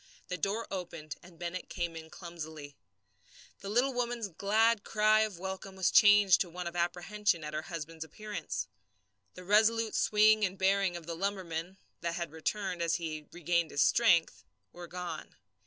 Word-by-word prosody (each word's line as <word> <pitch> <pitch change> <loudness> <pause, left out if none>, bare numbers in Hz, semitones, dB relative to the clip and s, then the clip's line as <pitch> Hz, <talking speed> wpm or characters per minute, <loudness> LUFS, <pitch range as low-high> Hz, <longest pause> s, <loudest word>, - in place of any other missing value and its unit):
The 180 - -2
door 210 +4 -1
opened 165 -5 -5
and 175 -1 -16
Bennett 175 +2 -5
came 170 -1 -3
in 160 0 -9
clumsily. 160 -5 -8 0.8
The 195 - -7
woman's 245 0 0
little 165 - -25
glad 220 +3 +3
cry 215 0 +3
of 215 -4 0
welcome 190 +1 -6
was 190 -2 +1
changed 205 -3 +7
to 180 - -1
one 180 +1 -6
of 170 0 -5
apprehension 175 +2 0
at 150 0 -6
her 155 - -2
husband's 165 -1 -6
appearance. 160 - -5 0.7
The 180 - -10
resolute 220 +3 +3
swing 215 0 +4
and 190 -1 0
bearing 190 -1 +2
of 170 - -10
the 170 - -4
lumberman 185 -1 -3 0.2
that 170 0 -2
had 170 -3 -4
returned 180 +3 -3
as 165 -1 +1
he 155 -3 -5
regained 170 -1 0
his 145 - +2
strength 170 - +3 0.3
were 175 0 -9
gone. 175 -2 -6
180 Hz, 165 wpm, -31 LUFS, 165-205 Hz, 0.8 s, changed